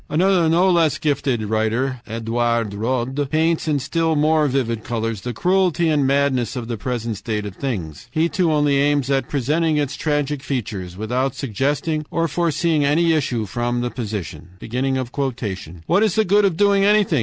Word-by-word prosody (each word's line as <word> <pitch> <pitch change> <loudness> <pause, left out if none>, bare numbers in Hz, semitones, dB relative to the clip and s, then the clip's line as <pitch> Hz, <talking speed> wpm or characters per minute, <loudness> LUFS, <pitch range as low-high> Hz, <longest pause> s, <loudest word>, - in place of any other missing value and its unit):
Another 175 0 +3
no 175 +4 +4
less 165 -4 +3
gifted 135 -6 0
writer, 110 +4 -1
Edouard 115 -1 -1
Rod, 130 +5 -2
paints 160 +2 +1
in 150 -2 +2
still 165 +3 0
more 155 0 +3
vivid 120 -5 -1
colors 115 -3 -3
the 125 - -4
cruelty 180 - +1
and 145 -3 +2
madness 135 -3 +1
of 120 -3 -4
the 120 - -3
present 115 0 -3
state 105 0 -3
of 100 -3 -7
things. 90 - -5
He 160 +1 +1
too 170 -1 +1
only 145 -2 +2
aims 140 -1 +1
at 135 -2 0
presenting 150 +4 +1
its 145 -2 -1
tragic 145 -2 -1
features, 100 -10 -4
without 125 +5 -1
suggesting 140 +5 -1
or 165 0 0
forseeing 165 -1 +1
any 165 +4 +3
issue 125 -7 0
from 120 +4 -2
the 120 0 -2
position. 100 - -6 1.4
"What 180 +4 +2
is 215 -4 +2
the 220 -1 +3
good 205 +3 +4
of 180 -5 0
doing 200 0 +4
anything? 205 -7 +3
140 Hz, 165 wpm, -21 LUFS, 115-160 Hz, 1.4 s, no